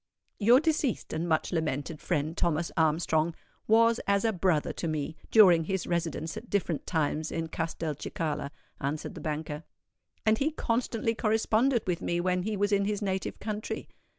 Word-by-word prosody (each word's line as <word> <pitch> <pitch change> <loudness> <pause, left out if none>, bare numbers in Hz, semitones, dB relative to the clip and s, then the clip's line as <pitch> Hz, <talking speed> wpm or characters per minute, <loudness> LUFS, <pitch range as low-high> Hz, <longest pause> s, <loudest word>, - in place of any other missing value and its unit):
"Your 235 +4 +6
deceased 305 -5 0
and 165 +2 -2
much 160 -1 +1
lamented 155 -2 -2
friend 155 +2 -1
Thomas 170 0 0
Armstrong 160 0 +2 0.3
was 230 +1 +5
as 200 +1 +2
a 225 - +2
brother 175 -4 +1
to 170 - -3
me, 155 0 -2
during 180 -7 +7
his 190 +1 -1
residence 165 -2 -2
at 240 - -8
different 180 -6 -1
times 155 -1 0
in 165 -1 -3
Castelcicala," 160 -2 -3 0.3
answered 145 +3 -3
the - - -8
banker; 150 0 -4 0.6
"and 220 0 +3
he 285 - +2
constantly 230 -4 0
corresponded 225 +3 +2
with 180 -2 -1
me 175 - 0
when 180 +1 +1
he 210 +2 -2
was 205 +1 +1
in 200 -1 +3
his 205 0 -1
native 190 -1 -2
country. 215 0 -4
175 Hz, 160 wpm, -29 LUFS, 160-215 Hz, 0.6 s, during